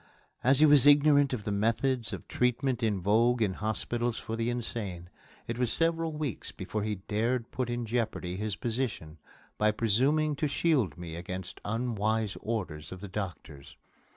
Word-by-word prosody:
As 135 +3 +5
he - - +9
was 145 -2 +6
ignorant 145 -1 +6
of 120 -5 -3
the 105 - -2
methods 115 +4 +1
of - - -7
treatment 125 +1 0
in 105 -4 0
vogue 115 +5 +3
in 105 -4 +1
hospitals 115 +3 -2
for 115 - -4
the 115 +1 -1
insane, 105 -7 -4 0.3
it 115 +1 -4
was 125 -3 +1
several 165 0 +1
weeks 150 -5 -4
before 105 +3 -4
he 105 0 -1
dared 115 +3 0
put 125 -2 -2
in 120 0 -2
jeopardy 110 -6 -2
his 105 +1 -2
position 110 -11 -3 0.4
by 105 - +4
presuming 130 +8 +2
to 150 - +1
shield 140 - +1
me 85 -2 -7
against 90 +2 -6
unwise 110 -1 -1
orders 90 -9 -4
of 95 - -7
the 100 - -7
doctors. 90 -8 -7
115 Hz, 165 wpm, -29 LUFS, 105-130 Hz, 0.4 s, he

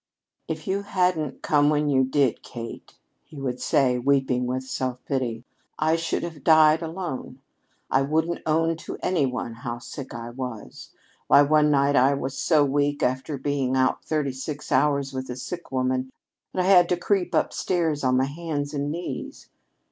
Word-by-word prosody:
"If 160 -1 -5
you 195 +1 -1
hadn't 180 -7 -1
come 145 -1 +3
when 150 0 +1
you 135 -2 +3
did, 130 -1 +1
Kate," 115 -1 -9 0.3
he 150 - -12
would 125 -2 -3
say, 125 -3 +2
weeping 130 -1 +1
with 130 +1 -2
self 130 -1 -3
pity, 125 -4 -2 0.3
"I 155 +1 +2
should 165 0 -2
have 160 -5 -7
died 155 0 +6
alone. 160 -6 -5 0.5
I 135 - +4
wouldn't 160 +4 0
own 165 +1 +2
to - - -7
any 160 -7 +2
one 125 -2 -4
how 120 +1 -5
sick 130 +3 -8
I 115 0 -6
was. 125 -4 -7 0.4
Why, 145 - +7
one 150 +1 +4
night 140 0 +3
I 135 +2 +4
was 135 0 -4
so 155 -4 +3
weak, 145 +1 0
after 130 +4 -1
being 135 -1 -1
out 130 0 +1
thirty 150 -4 -1
six 145 +3 -6
hours 140 0 +2
with 130 0 -5
a 125 - -4
sick 170 +7 -7
woman, 130 0 0 0.4
that 185 - -1
I 180 - 0
had 180 -3 +6
to 180 - +2
creep 180 0 0
upstairs 165 -5 0
on 130 -1 +3
my 130 - +3
hands 145 -1 -4
and 145 0 -2
knees." 170 +3 -6
140 Hz, 175 wpm, -25 LUFS, 130-160 Hz, 0.5 s, Why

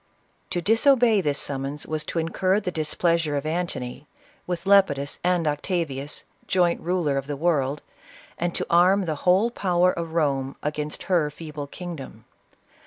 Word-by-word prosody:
To 175 - -2
disobey 230 - +4
this 145 -4 0
summons 140 +1 -3
was 155 -1 -2
to - - -4
incur 185 +4 +1
the 190 -3 -3
displeas 165 +1 +1
ure 145 - -1
of 140 +1 -2
Antony, 155 -5 -3 0.4
with 175 0 -3
Lepidus 165 -9 +3
and 180 -2 +2
Octavius, 150 -2 -2 0.2
joint 175 -2 +2
ruler 170 -5 0
of 135 - -8
the 145 -1 -3
world, 145 -3 0 0.6
and 175 0 -1
to - - -1
arm 185 +4 +4
the 160 -3 -1 0.2
whole 200 +6 +4
power 180 -4 +2
of 165 -2 -5
Rome 135 -4 0
against 150 0 -3
her 170 -5 +2
feeble 150 -1 -7
kingdom. 140 -9 -8
165 Hz, 155 wpm, -24 LUFS, 145-180 Hz, 0.6 s, disobey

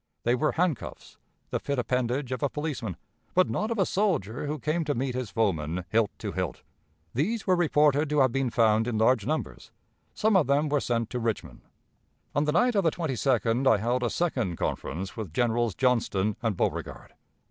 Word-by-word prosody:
They 120 - +2
were 150 +5 +1
handcuffs, 170 -5 -3 0.3
the - - 0
fit 140 -1 -3
appendage 125 +1 -1
of 130 - -3
a 145 - +1
policeman, 145 - -4 0.4
but 185 0 +4
not 215 - -1
of 230 - -2
a 195 - +3
soldier 165 - -1
who 150 +1 -2
came 155 +5 -1
to 145 - 0
meet 130 +1 -1
his 125 -3 -3
foeman 90 -6 -1
hilt 110 0 +2
to - - -4
hilt. - - -4 0.5
These 200 - -1
were 185 - +4
reported 150 -3 +3
to 150 -1 +3
have 130 -2 +4
been 135 0 0
found 110 -1 +3
in 120 -3 -1
large 110 0 +3
numbers; 155 +2 -3 0.5
some 215 -1 +2
of 180 -6 +4
them 145 +2 +2
were 145 0 +2
sent 115 -2 -1
to 125 - -2
Richmond. 110 - -3 0.7
On 145 - +1
the 150 - +1
night 245 +10 +3
of 200 -2 +2
the 165 - +4
22d 130 - 0
I 110 - +4
held 120 +5 0
a 120 - +1
second 120 - -1
conference 95 +3 -3
with 110 -8 -5
Generals 120 0 +1
Johnston 110 -5 +1
and 110 -5 -1
Beauregard. - - -3
130 Hz, 190 wpm, -27 LUFS, 115-150 Hz, 0.7 s, but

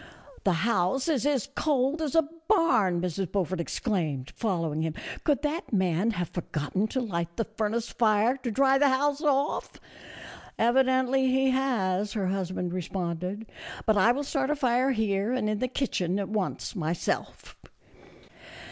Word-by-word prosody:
" 280 - -21
The 195 - +4
house 230 - +1
is 290 -4 +1
as 275 -2 0
cold 285 +1 +1
as 305 -2 -2
a 325 -2 +4 0.2
barn," 330 - +3
Mrs. 180 0 -2
Beaufort 185 -2 -1
exclaimed, 160 - -2
following 165 -8 -1
him; 160 -1 -2
" - - -9
could 290 -2 +2
that 305 +3 -2
man 190 0 +1
have 180 -6 -2
forgotten 175 +4 -2
to 260 - -2
light 170 -7 -3
the 225 - +1
furnace 220 +1 -2
fire 220 +2 +3
to 255 -2 -4
dry 270 +4 +3
the 285 0 +5
house 285 +2 +1
off?" 285 -2 0 0.5
" - - -15
Evidently 260 +2 +3
he 265 +1 +3
has," 210 -7 0
her 205 -3 -1
husband 185 -2 -2
responded; 180 +3 -3 0.2
" - - -10
but 220 - +3
I 210 +3 +5
will 280 +4 -1
start 275 -1 -1
a 300 - +2
fire 255 -1 +2
here 215 -2 0
and 255 -4 0
in 215 -1 -1
the 255 - 0
kitchen 195 -9 -1
at 200 -2 -3
once, 210 -1 -2
myself." 170 -2 -3
220 Hz, 165 wpm, -27 LUFS, 185-265 Hz, 0.5 s, the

